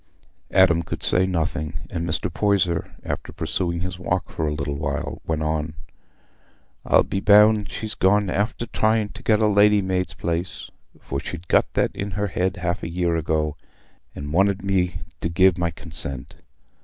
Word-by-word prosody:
Adam 90 Hz, -3 st, +4 dB
could 85 Hz, -, -6 dB
say 95 Hz, +1 st, +4 dB
nothing; 80 Hz, -3 st, -2 dB, 0.2 s
and 85 Hz, +1 st, -3 dB
Mr. -, -, -1 dB
Poyser, 95 Hz, -5 st, +1 dB
after -, -, -4 dB
pursuing 85 Hz, -2 st, -2 dB
his 90 Hz, 0 st, -4 dB
walk 90 Hz, 0 st, -2 dB
for 80 Hz, -, -2 dB
a -, -, 0 dB
little 70 Hz, -1 st, -3 dB
while, 70 Hz, -, -3 dB
went 80 Hz, -1 st, -1 dB
on, 80 Hz, 0 st, -2 dB, 1.1 s
"I'll -, -, +4 dB
be 95 Hz, -, -2 dB
bound 105 Hz, +1 st, +5 dB
she's 110 Hz, -1 st, -5 dB
gone 105 Hz, +2 st, +3 dB
after 105 Hz, +5 st, -1 dB
trying 110 Hz, -2 st, +1 dB
to -, -, -11 dB
get 110 Hz, -1 st, +3 dB
a 110 Hz, -, +3 dB
lady's 105 Hz, -1 st, +4 dB
maid's 90 Hz, -3 st, -1 dB
place, 85 Hz, +1 st, -3 dB, 0.3 s
for 70 Hz, -, -4 dB
she'd 85 Hz, +5 st, -7 dB
got -, -, +3 dB
that -, -, +2 dB
in 100 Hz, -, -3 dB
her 105 Hz, -, 0 dB
head 90 Hz, +2 st, -1 dB
half 90 Hz, -1 st, -2 dB
a 85 Hz, -, -4 dB
year 85 Hz, -1 st, 0 dB
ago, 80 Hz, -1 st, 0 dB, 0.6 s
and 75 Hz, +1 st, -6 dB
wanted 95 Hz, +2 st, +2 dB
me 90 Hz, -3 st, 0 dB, 0.2 s
to 80 Hz, -, -2 dB
gi' 95 Hz, +3 st, +5 dB
my 85 Hz, -1 st, 0 dB
consent. 75 Hz, -4 st, -5 dB
90 Hz, 170 wpm, -23 LUFS, 80-100 Hz, 1.1 s, bound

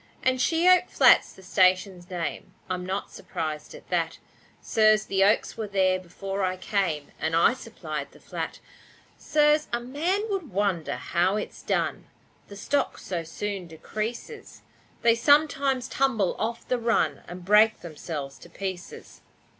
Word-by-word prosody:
And 255 Hz, 0 st, +2 dB
She 330 Hz, +5 st, +2 dB
oak 365 Hz, 0 st, +5 dB
Flat's -, -, +5 dB
the 190 Hz, -, -16 dB
station's 185 Hz, -1 st, +2 dB
name, 180 Hz, +1 st, -5 dB, 0.2 s
I'm 180 Hz, -1 st, -2 dB
not 190 Hz, +2 st, -4 dB
surprised 155 Hz, -2 st, -5 dB
at -, -, -14 dB
that, -, -, 0 dB, 0.4 s
sirs: 215 Hz, -1 st, +3 dB
The 195 Hz, 0 st, +2 dB
oaks 210 Hz, +3 st, +2 dB
were 220 Hz, -2 st, -3 dB
there 190 Hz, -2 st, +2 dB
before 195 Hz, +2 st, -5 dB
I 185 Hz, 0 st, 0 dB
came, 185 Hz, -7 st, -1 dB
And 160 Hz, -, -1 dB
I 170 Hz, +9 st, +5 dB
supplied 155 Hz, -, -6 dB
the -, -, -18 dB
flat, -, -, -5 dB, 0.6 s
sirs. 300 Hz, 0 st, +3 dB
A 235 Hz, -, 0 dB
man 330 Hz, -, -1 dB
would 380 Hz, -6 st, -3 dB
wonder 190 Hz, -4 st, -1 dB
how 180 Hz, +3 st, 0 dB
it's 210 Hz, -, -5 dB
done, -, -, -1 dB, 0.4 s
The 200 Hz, -, -11 dB
stock 285 Hz, +8 st, -1 dB
so 175 Hz, -3 st, -4 dB
soon 195 Hz, +2 st, -5 dB
decreases 215 Hz, +8 st, -6 dB, 0.4 s
They 230 Hz, -, +6 dB
sometimes 275 Hz, 0 st, +3 dB
tumble 230 Hz, -9 st, +1 dB
off 230 Hz, +1 st, -3 dB
the 250 Hz, -, 0 dB
run 235 Hz, 0 st, +1 dB
And 175 Hz, +1 st, -9 dB
break 215 Hz, +3 st, +5 dB
themselves 150 Hz, -4 st, -6 dB
to 170 Hz, -, -14 dB
pieces. 185 Hz, 0 st, -7 dB
200 Hz, 150 wpm, -26 LUFS, 180-240 Hz, 0.6 s, They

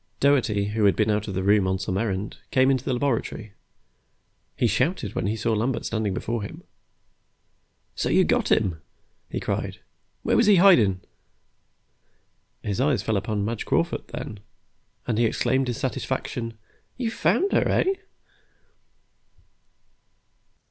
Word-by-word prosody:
Doherty, 115 Hz, -8 st, +2 dB
who 105 Hz, 0 st, +1 dB
had 100 Hz, -, +4 dB
been 110 Hz, 0 st, +2 dB
out 105 Hz, 0 st, -1 dB
of 100 Hz, -, -4 dB
the 95 Hz, -, -1 dB
room 100 Hz, -1 st, +4 dB
on 95 Hz, 0 st, +1 dB
some 95 Hz, 0 st, -3 dB
errand, 100 Hz, -1 st, -2 dB
came 130 Hz, +1 st, +4 dB
into 130 Hz, -2 st, 0 dB
the 130 Hz, -, -1 dB
laboratory. 120 Hz, -5 st, -2 dB, 1.0 s
He -, -, +1 dB
shouted 120 Hz, -, 0 dB
when -, -, -1 dB
he 105 Hz, -, 0 dB
saw 115 Hz, +1 st, 0 dB
Lambert 115 Hz, +3 st, -1 dB
standing 110 Hz, -2 st, -1 dB
before 115 Hz, +3 st, -2 dB
him. 100 Hz, -, -8 dB, 1.3 s
"So -, -, -1 dB
you -, -, +4 dB
got -, -, +1 dB
him," 90 Hz, -8 st, +1 dB, 0.5 s
he -, -, -3 dB
cried. -, -, -3 dB, 0.5 s
"Where -, -, +2 dB
was -, -, +4 dB
he 205 Hz, -, +7 dB
hidin'?" 120 Hz, -, +5 dB, 1.6 s
His 105 Hz, +3 st, -1 dB
eyes 135 Hz, -7 st, +2 dB
fell 110 Hz, 0 st, 0 dB
upon 105 Hz, +1 st, -1 dB
Madge 115 Hz, 0 st, -3 dB
Crawford, -, -, 0 dB
then, 105 Hz, -, -7 dB, 0.7 s
and 115 Hz, -2 st, -1 dB
he 120 Hz, -, +4 dB
exclaimed 130 Hz, +3 st, +1 dB
in 120 Hz, -, -2 dB
satisfaction. 115 Hz, 0 st, -3 dB, 0.4 s
"You 240 Hz, -3 st, -2 dB
found 225 Hz, -, +1 dB
her, -, -, +3 dB
eh?" 385 Hz, -, +2 dB
110 Hz, 145 wpm, -25 LUFS, 100-130 Hz, 1.6 s, he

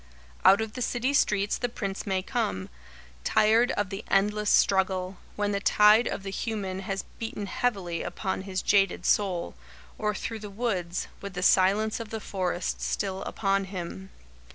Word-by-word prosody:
Out 195 Hz, +3 st, +7 dB
of 220 Hz, -1 st, -4 dB
the 250 Hz, -, -6 dB
city 245 Hz, +3 st, 0 dB
streets 205 Hz, -6 st, +2 dB
The 245 Hz, -, -1 dB
Prince 200 Hz, -4 st, -4 dB
may 190 Hz, -1 st, 0 dB
come, 190 Hz, -, -2 dB, 0.5 s
tired 225 Hz, +3 st, +4 dB
of 205 Hz, -1 st, -2 dB
the 195 Hz, +2 st, -5 dB
endless 210 Hz, +2 st, +2 dB
struggle, 190 Hz, -1 st, +2 dB, 0.2 s
when 205 Hz, 0 st, 0 dB
the 200 Hz, -, 0 dB
tide 210 Hz, +3 st, +5 dB
of 195 Hz, -, -3 dB
the 195 Hz, -, -5 dB
human 195 Hz, -3 st, -3 dB
has 195 Hz, 0 st, -3 dB, 0.2 s
beaten 225 Hz, -2 st, -4 dB
heavily 195 Hz, -6 st, -1 dB
upon 190 Hz, -2 st, -3 dB
his 190 Hz, -1 st, -3 dB
jaded 195 Hz, -3 st, +2 dB
soul, 185 Hz, -4 st, +1 dB, 0.5 s
or 210 Hz, -1 st, 0 dB
through 225 Hz, +1 st, -4 dB
the 210 Hz, -1 st, -7 dB
woods, 195 Hz, -5 st, -2 dB
with 200 Hz, -2 st, -7 dB
the 180 Hz, -, -2 dB
silence 200 Hz, +5 st, +3 dB
of 225 Hz, -2 st, -6 dB
the 220 Hz, -, -4 dB
forest 185 Hz, -3 st, -2 dB
still 195 Hz, -2 st, -2 dB
upon 195 Hz, -1 st, 0 dB
him. 190 Hz, 0 st, -7 dB
200 Hz, 165 wpm, -27 LUFS, 190-215 Hz, 0.5 s, Out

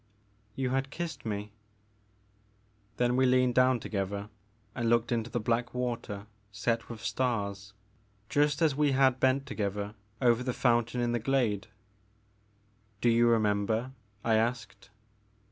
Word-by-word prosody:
'' 105 Hz, 0 st, -38 dB
*' -, -, -39 dB
You 130 Hz, -1 st, -1 dB
had 135 Hz, +1 st, 0 dB
kissed 165 Hz, -4 st, -5 dB
me 105 Hz, 0 st, -4 dB, 0.7 s
'* 105 Hz, +1 st, -37 dB
Then 125 Hz, 0 st, +2 dB
we 130 Hz, 0 st, +4 dB
leaned 125 Hz, -1 st, +3 dB
down 130 Hz, 0 st, +4 dB
together 100 Hz, -1 st, -3 dB, 0.4 s
and 115 Hz, -2 st, -1 dB
looked 120 Hz, +1 st, +2 dB
into 115 Hz, -1 st, -1 dB
the 120 Hz, -, -2 dB
black 120 Hz, +3 st, -1 dB
water 115 Hz, -5 st, -3 dB, 0.3 s
set 115 Hz, +3 st, -1 dB
with 115 Hz, -2 st, -8 dB
stars, 100 Hz, -5 st, -2 dB, 0.5 s
just 145 Hz, +4 st, +2 dB
as 150 Hz, -4 st, +3 dB
we 145 Hz, -1 st, +2 dB
had 130 Hz, -1 st, +3 dB
bent 130 Hz, +1 st, +2 dB
together 105 Hz, -5 st, -3 dB, 0.3 s
over 120 Hz, -2 st, +3 dB
the 125 Hz, 0 st, -2 dB
fountain 120 Hz, 0 st, +1 dB
in 120 Hz, 0 st, +1 dB
the 120 Hz, -, 0 dB
glade. 115 Hz, -4 st, 0 dB, 1.3 s
Do 120 Hz, -, +3 dB
you 120 Hz, +1 st, +4 dB
remember? 110 Hz, +2 st, +1 dB, 0.2 s
'* 105 Hz, 0 st, -37 dB
I 110 Hz, -1 st, +4 dB
asked. 115 Hz, -4 st, -2 dB
115 Hz, 150 wpm, -30 LUFS, 105-125 Hz, 1.3 s, we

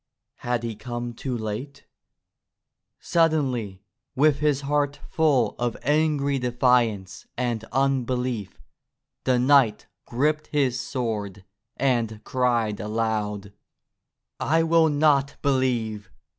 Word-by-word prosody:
Had 120 Hz, -1 st, -2 dB
he 115 Hz, -2 st, -4 dB
come 120 Hz, +2 st, -5 dB
too 125 Hz, +1 st, -4 dB
late? 115 Hz, +6 st, -6 dB, 1.1 s
Suddenly, 130 Hz, -, 0 dB, 0.3 s
with 145 Hz, +1 st, +3 dB
his 145 Hz, -2 st, +1 dB
heart 145 Hz, 0 st, 0 dB
full 140 Hz, -9 st, +2 dB
of 120 Hz, -1 st, -1 dB
angry 145 Hz, -1 st, +1 dB
defiance 120 Hz, -6 st, +1 dB
and 120 Hz, -3 st, -1 dB
unbelief, 125 Hz, -4 st, -1 dB, 0.7 s
the 130 Hz, -1 st, +3 dB
knight 130 Hz, -3 st, +4 dB, 0.2 s
gripped 150 Hz, +5 st, 0 dB
his 135 Hz, -4 st, 0 dB
sword 105 Hz, -8 st, -4 dB, 0.3 s
and 120 Hz, -5 st, 0 dB
cried 120 Hz, -5 st, 0 dB
aloud: 105 Hz, -1 st, -2 dB, 0.9 s
'T 165 Hz, +2 st, +2 dB
will 165 Hz, -1 st, +4 dB
not 145 Hz, -2 st, +2 dB
believe! 120 Hz, -6 st, 0 dB
125 Hz, 100 wpm, -25 LUFS, 110-140 Hz, 1.1 s, knight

